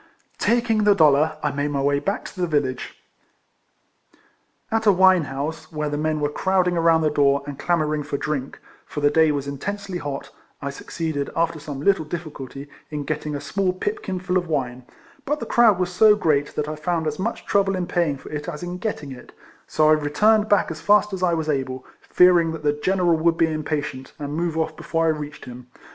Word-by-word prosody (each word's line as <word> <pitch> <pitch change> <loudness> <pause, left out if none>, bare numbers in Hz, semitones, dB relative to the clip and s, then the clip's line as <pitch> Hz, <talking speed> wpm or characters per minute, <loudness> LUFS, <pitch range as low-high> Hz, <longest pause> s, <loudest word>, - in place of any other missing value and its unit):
Taking 230 -2 +2
the 205 -1 +5
dollar, 155 -1 +4
I 150 - +1
made 145 +1 -1
my 140 -2 -1
way 140 0 +2
back 195 +8 -3
to 185 - -7
the 175 - +1
village. 145 -5 -2 1.8
At 225 0 0
a - - +8
wine 185 -3 +5
house, 150 +4 -5
where 150 -1 -2
the 145 - -2
men 155 0 0
were 145 0 0
crowding 185 +1 +1
around 165 -1 +3
the 155 -1 +1
door, 140 -1 +2
and 145 -2 -7
clamouring 155 -3 0
for 145 -1 -3
drink, 140 -3 -4 0.2
(for - - -6
the 145 0 +3
day 160 0 +4
was 140 -1 -3
intensely 190 +6 -4
hot,) 140 -3 -6 0.3
I 140 0 -4
succeeded, 150 0 -4
after 165 -1 0
some 145 -2 -7
little 195 0 +3
difficulty, 150 -4 -7 0.2
in 150 -1 -4
getting 150 0 -3
a - - -3
small 180 +6 -1
pipkin 195 - -3
full 185 0 0
of 175 - -7
wine; 130 -5 -3 0.4
but 295 +2 -1
the - - -4
crowd 230 -5 +4
was 180 -1 -1
so 210 +3 +6
great, 150 -7 0
that 150 - -2
I 155 - -4
found 160 +1 -2
as 150 -1 -3
much 225 +5 -3
trouble 195 -1 +2
in 180 -1 -2
paying 170 -5 0
for - - -12
it 150 +1 -4
as 150 -1 -7
in 175 +1 -5
getting 165 -11 -4
it; 125 -2 -11 0.4
so 155 -1 +2
I - - +6
returned 210 +9 +2
back 205 -4 +3
as 160 - -7
fast 210 0 +3
as 190 - -4
I 175 -2 +2
was 160 -1 -3
able, 130 -3 -2 0.2
fearing 175 -2 +4
that 160 -1 -7
the 145 0 +2
general 175 +2 +1
would 165 +1 +2
be 160 -1 +2
impatient, 145 -4 -4
and 145 -2 -5
move 165 0 -2
off 160 -1 -1
before 165 +1 -1
I - - +3
reached 150 -1 -4
him. 125 0 -10
155 Hz, 210 wpm, -23 LUFS, 145-180 Hz, 1.8 s, a